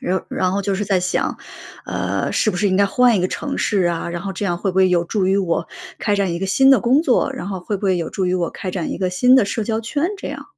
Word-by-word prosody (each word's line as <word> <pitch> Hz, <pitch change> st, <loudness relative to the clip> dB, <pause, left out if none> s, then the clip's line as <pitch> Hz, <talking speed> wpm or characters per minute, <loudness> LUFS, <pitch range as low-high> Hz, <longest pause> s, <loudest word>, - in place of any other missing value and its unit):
然 185 Hz, +1 st, -1 dB
然 185 Hz, -1 st, 0 dB
后 200 Hz, -, 0 dB
就 200 Hz, 0 st, -1 dB
是 205 Hz, +2 st, -2 dB
在 195 Hz, -2 st, +1 dB
想， 180 Hz, +1 st, -1 dB, 0.5 s
呃， -, -, -2 dB
是 215 Hz, -, +2 dB
不 180 Hz, -, -5 dB
是 200 Hz, +1 st, +1 dB
应 185 Hz, -, 0 dB
该 200 Hz, -, +4 dB
换 245 Hz, +3 st, +3 dB
一 -, -, 0 dB
个 185 Hz, -, 0 dB
城 280 Hz, -2 st, -4 dB
市 200 Hz, -3 st, +1 dB
啊， 170 Hz, -1 st, -1 dB
然 170 Hz, 0 st, -4 dB
后 195 Hz, +2 st, -5 dB
这 190 Hz, +2 st, -4 dB
样 175 Hz, -3 st, -1 dB
会 195 Hz, -, -2 dB
不 -, -, -9 dB
会 190 Hz, -1 st, +5 dB
有 175 Hz, -1 st, +2 dB
助 190 Hz, +2 st, -1 dB
于 195 Hz, -, +3 dB
我 170 Hz, -3 st, -1 dB, 0.3 s
开 205 Hz, -1 st, +1 dB
展 195 Hz, -3 st, 0 dB
一 170 Hz, -, -4 dB
个 195 Hz, -, -1 dB
新 270 Hz, +7 st, +4 dB
的 270 Hz, -, +6 dB
工 255 Hz, +5 st, +3 dB
作， 270 Hz, -2 st, +1 dB
然 265 Hz, -6 st, -6 dB
后 190 Hz, -2 st, -4 dB
会 205 Hz, +3 st, -3 dB
不 200 Hz, -, -7 dB
会 190 Hz, -2 st, +2 dB
有 165 Hz, -2 st, -3 dB
助 190 Hz, -, -2 dB
于 180 Hz, -, 0 dB
我 175 Hz, -2 st, -1 dB
开 190 Hz, -, -7 dB
展 175 Hz, -4 st, -3 dB
一 -, -, -4 dB
个 185 Hz, -, 0 dB
新 250 Hz, +8 st, +4 dB
的 260 Hz, -, +4 dB
社 210 Hz, +2 st, -2 dB
交 220 Hz, +1 st, -1 dB
圈 285 Hz, +7 st, -2 dB
这 -, -, -6 dB
样。 -, -, -6 dB
195 Hz, 330 characters per minute, -20 LUFS, 180-215 Hz, 0.5 s, 的